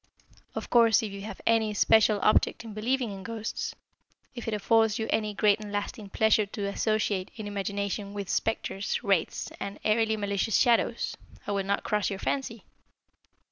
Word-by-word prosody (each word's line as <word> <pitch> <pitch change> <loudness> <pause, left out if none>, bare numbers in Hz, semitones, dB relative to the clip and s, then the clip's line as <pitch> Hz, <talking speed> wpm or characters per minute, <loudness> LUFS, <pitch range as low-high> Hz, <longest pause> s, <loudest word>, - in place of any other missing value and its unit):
Of - - -5
course, 230 -2 +5
if 210 - -4
you 200 0 -7
have 200 -1 -8
any 225 -1 +3
especial 215 0 +4
object 215 - +3
in 225 -2 -8
believing 240 +2 -1
in 195 -1 -7
ghosts 225 +1 -4 0.6
if 240 -3 -7
it 225 - -1
affords 225 +1 +3
you 220 - -2
any 215 -1 0
great 210 0 +3
and 210 -1 -8
lasting 205 +1 -4
pleasure 220 0 +3
to 200 0 -4
associate, 205 -1 0
in 220 - -6
imagination, 200 0 -3
with 200 -2 -4
spectres, 205 0 -1
wraiths, 195 -6 0
and 200 - -5
airily 220 0 +2
malicious 205 +1 0
shadows, 240 -3 +2 0.3
I - - -3
will 200 -1 -1
not 200 +1 0
cross 210 -1 0
your 195 - -3
fancy. 235 0 -3
210 Hz, 170 wpm, -28 LUFS, 200-225 Hz, 0.6 s, course